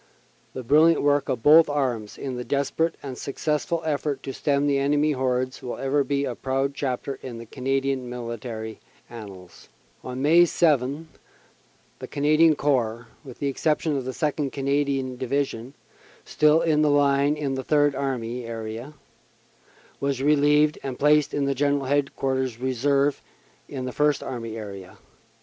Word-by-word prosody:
The 130 - -5
brilliant 155 +6 +4
work 145 -1 +2
of 125 -4 -2
both 155 +1 +7
arms 125 -7 -2
in 135 -2 -5
the 125 - -4
desper 140 +5 0
ate - - -13
and 135 -2 -6
successful 150 +5 -2
effort 145 -2 -2
to 135 - -5
stem 140 0 0
the 140 -1 +2
enemy 145 +2 +2
hordes 130 -1 -1
will 125 -2 -5
ever 140 +1 +1
be 140 0 -1
a 125 - -3
proud 135 +3 -1
chapter 135 0 -3
in 115 -2 -8
Canadian 135 +1 -2
military 115 -2 -6 0.3
annals. 100 -6 -11 0.3
On 125 0 -6
May 165 +5 +5
7 150 -2 +1 0.9
the - - -7
Canadian 155 +2 +3
Corps, 120 -5 -1
with 130 -4 -11
the - - -4
exception 150 +2 0
of 135 -2 -3
the - - -4
2nd. 145 0 -2
Canadian 140 -2 -1
Division, 130 -1 -3 0.5
still 155 +2 +3
in 155 -2 +2
the 150 - +3
line 145 0 +3
in 140 -2 -2
the 130 0 -3
Third 145 -1 +3
Army 125 -3 -3
area, 115 +4 -6 1.0
was 140 -2 -1
relieved 150 +1 +3
and 135 -2 -5
placed 150 0 +3
in 140 -1 0
General 140 0 0
Headquarters 130 -3 -1
Reserve 140 +3 +1 0.5
in 130 -3 -5
the 130 - -4
First 150 +2 +1
Army 115 -3 -5
area. 100 -4 -9
140 Hz, 150 wpm, -24 LUFS, 125-145 Hz, 1.0 s, both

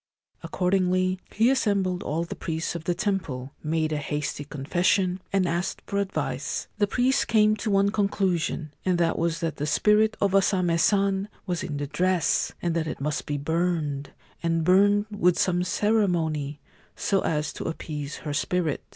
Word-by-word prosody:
Accordingly, 185 0 +1
he 230 +4 +3
assembled 200 -8 +1
all 160 +3 -1
the 170 - -6
priests 160 -1 -3
of 170 -1 -6
the 175 - 0
temple, 150 -11 -2
made 155 0 0
a - - 0
hasty 145 0 -3
confession, 180 +6 0
and 195 -2 +2
asked 170 +2 -2
for 200 - -1
advice. 200 -1 -2
The 205 - +3
priests 255 +5 +2
came 215 -1 +3
to 215 - -3
one 200 0 +3
conclusion, 185 -7 0
and 185 -2 +1
that 170 -1 +1
was 170 0 0
that 165 -2 -2
the 150 - -2
spirit 215 +7 +3
of 200 -1 +1
O 195 - +7
Same 185 -3 +1
San 195 +2 +2 0.2
was 180 -3 -2
in 155 -5 -4
the 145 - -2
dress, 175 +2 +1
and 170 -1 0
that 160 -1 0
it - - -5
must 150 +2 -2
be 145 - -1
burned, 155 -2 -1 0.3
and 165 -1 +1
burned 205 +4 +4
with 180 -4 +2
some 180 -1 +2
ceremony, 170 -9 0 0.4
so 195 -1 +1
as 150 -2 -1
to - - -6
appease 150 -3 -5
her 150 - -2
spirit. 160 0 0
180 Hz, 170 wpm, -26 LUFS, 155-195 Hz, 0.4 s, O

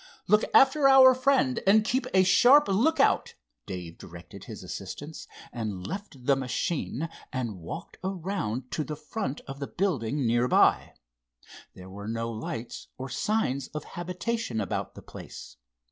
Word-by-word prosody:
"Look 210 +3 +5
after 275 +1 +5
our 260 -1 +8
friend 255 - +2
and 210 +2 +6
keep 260 +4 0
a 190 0 +5
sharp 260 +10 +6
lookout," 235 +12 +2 0.3
Dave 90 -3 -7
directed - - -11
his - - -9
assistants, 150 +2 -7 0.3
and 105 -6 -4
left 190 -10 -7
the 140 - +4
machine 135 +3 -2 0.2
and 120 -8 -4
walked 85 - -8
around 175 - -3
to 155 - -1
the 150 - -5
front 150 0 -5
of 135 0 -9
the 140 - -4
building 145 - -1
nearby. 120 +2 +3 0.8
There 90 0 -11
were 100 +1 -8
no 115 +1 -3
lights 115 +1 -6
or 130 +1 -6
signs 140 - -1
of 150 - -3
habitation 180 - -3
about 100 - -3
the - - -11
place. - - -11
145 Hz, 145 wpm, -27 LUFS, -, 0.8 s, our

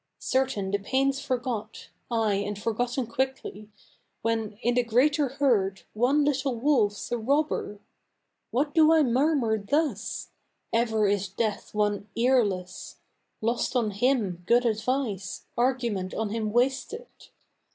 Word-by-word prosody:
Certain 255 -8 -1
the 200 - +1
pain's 270 +6 +1
forgot 250 -5 -4 0.2
ay, 225 -3 +1
and 200 +1 -2
forgotten 240 +4 -1
quickly, 235 -4 -3 0.5
When, 225 -2 -1
in 240 - +2
the 245 - +3
greater 275 +6 +2
herd, 240 -8 +1
one 265 +7 +2
little 275 -3 0
wolf's 230 -7 +1
a 240 - 0
robber! 280 -3 0 0.7
What 285 +4 0
do 320 -1 +6
I 320 -1 +5
murmur 255 -3 +2
thus? 240 - -1 0.4
Ever 225 -2 +2
is 200 -1 0
Death 210 +2 -3
one 205 0 0
earless. 210 -8 0 0.5
Lost 235 +3 -1
on 230 -4 +1
him 205 -5 0
good 245 +1 +4
advice, 220 -3 -2
argument 240 -7 0
on 220 -1 -1
him 215 0 -2
wasted. 265 - 0
235 Hz, 125 wpm, -27 LUFS, 210-265 Hz, 0.7 s, do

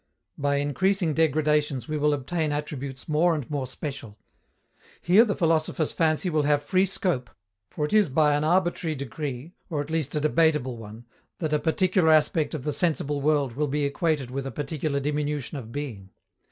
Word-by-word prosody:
By 140 0 0
increasing 165 +5 +1
degradations 150 -3 +1
we 155 - -3
will 150 0 +2
obtain 150 +3 -1
attributes 140 -3 -5
more 165 +2 +3
and 145 -5 -4
more 140 -3 -2
special. 130 -5 -7 0.8
Here 195 +6 +5
the 205 - -1
philosopher's 160 -2 +1
fancy 160 +2 +1
will 155 -3 +1
have 145 0 +2
free 185 +5 +2
scope, 155 -10 -1 0.4
for 150 - -2
it 150 - -5
is 210 -6 +4
by 150 +2 +3
an 145 +1 +1
arbitrary 175 -1 +1
decree, 140 +2 -5 0.2
or 155 -4 -2
at 145 +2 -4
least 160 -3 -1
a - - +2
debatable 150 -5 +2
one, 110 +2 -10 0.3
that 155 -3 -2
a 150 - +3
particular 175 +1 +2
aspect 155 +1 +3
of 140 - -5
the 150 - -2
sensible 150 -4 -1
world 145 -4 +1
will 150 +2 0
be 145 +1 0
equated 145 -3 -1
with 135 +1 -3
a - - -5
particular 145 +1 -2
diminution 150 0 -2
of 115 -3 -10
being. 115 -9 -6
150 Hz, 180 wpm, -26 LUFS, 140-160 Hz, 0.8 s, Here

